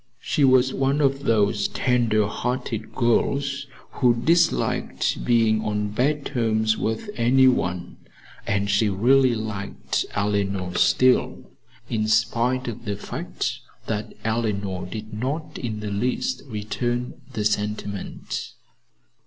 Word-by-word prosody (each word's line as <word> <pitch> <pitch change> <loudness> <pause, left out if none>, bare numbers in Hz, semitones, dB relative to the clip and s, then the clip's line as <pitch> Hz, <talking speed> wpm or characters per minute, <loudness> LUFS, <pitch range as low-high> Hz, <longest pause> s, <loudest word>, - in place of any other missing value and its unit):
She 145 +3 0
was 130 -1 +5
one 135 +2 +1
of 135 -1 +1
those 105 -2 +2
tender 115 -4 +1
hearted 120 0 -3
girls 140 +3 +1 0.2
who 125 -3 +3
disliked 165 +8 +1
being 115 -2 +3
on 105 -1 -1
bad 140 +6 0
terms 110 -4 +1
with 110 - -3
any 130 +3 +5
one, 90 -8 0 0.5
and 100 0 0
she 100 +2 +2
really 125 +5 +4
liked 110 -3 -3
Eleanor 100 -3 -1
still, 130 +6 +2 0.4
in 110 -2 -1
spite 115 +3 +1
of 120 0 -6
the 100 -1 -2
fact 100 - -4 0.3
that 105 -1 -4
Eleanor 100 -5 -1
did 110 +3 -7
not 150 +7 -3
in 110 -3 -4
the 105 -1 -4
least 125 - -1
return 120 +3 -3
the 105 -3 -2
sentiment. 105 -2 -3
115 Hz, 120 wpm, -24 LUFS, 105-130 Hz, 0.5 s, was